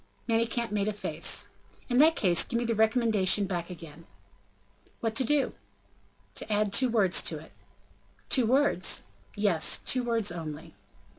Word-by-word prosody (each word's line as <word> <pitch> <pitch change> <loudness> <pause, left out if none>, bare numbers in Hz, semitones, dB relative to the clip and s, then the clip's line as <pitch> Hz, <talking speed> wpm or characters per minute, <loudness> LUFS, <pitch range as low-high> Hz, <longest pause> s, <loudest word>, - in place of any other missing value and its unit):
Manicamp 230 0 -1
made 205 -1 -1
a 215 - -1
face. 205 - -2 0.4
"In 245 -1 +1
that 320 +2 +5
case 175 -4 +2
give 235 - -3
me 240 - -2
the 230 - -1
recommendation 220 -3 +2
back 175 -2 -4
again." 165 -2 -12 0.9
"What 225 -1 -2
to 260 - +3
do?" 280 +2 +1 0.8
"To 220 - -2
add 205 -1 0
two 255 +2 +4
words 205 -6 +1
to - - -1
it." - - -14 0.8
"Two 255 -5 +2
words?" 260 -7 +2 0.3
"Yes; 175 -7 +3
two 255 -1 -1
words 230 -5 0
only." 160 -3 -8
215 Hz, 150 wpm, -28 LUFS, 185-235 Hz, 0.9 s, that